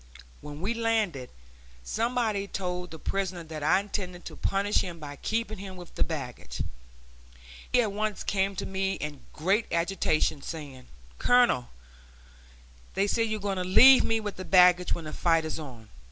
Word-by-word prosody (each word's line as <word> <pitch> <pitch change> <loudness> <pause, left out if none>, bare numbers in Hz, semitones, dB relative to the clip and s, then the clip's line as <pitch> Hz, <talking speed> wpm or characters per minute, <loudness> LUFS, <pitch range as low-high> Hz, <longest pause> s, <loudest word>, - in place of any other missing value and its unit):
When 150 +1 -8
we 205 +5 0
landed, 220 - 0 0.5
somebody 225 - -1
told 180 -2 -4
the 160 - -9
prisoner 185 0 -3
that 160 -1 -7
I 155 +5 +4
intended 190 -3 -5
to - - -7
punish 200 +1 0
him 175 -2 -1
by 145 -3 -8
keeping 220 +1 -2
him 190 -1 -8
with 175 -2 -11
the - - +1
baggage. 125 - -5 1.1
He 245 - +4
at 210 - -2
once 210 0 -2
came 195 0 0
to - - -3
me 190 0 -1
in 150 -5 -6
great 195 +8 +1
agitation, 170 -4 +1
saying: 140 -5 -8 0.3
"Colonel, 245 - +3 1.3
they 195 +1 +2
say 225 +3 +1
you're 215 -1 -2
going 200 -1 -2
to 185 - -1
leave 255 +9 +8
me 225 0 +1
with 210 -2 -5
the 185 - -5
baggage 180 -1 +5
when 170 - -7
the 155 - -6
fight 165 -2 +2
is 155 - -4
on. 125 -8 -10
185 Hz, 170 wpm, -28 LUFS, 160-205 Hz, 1.3 s, leave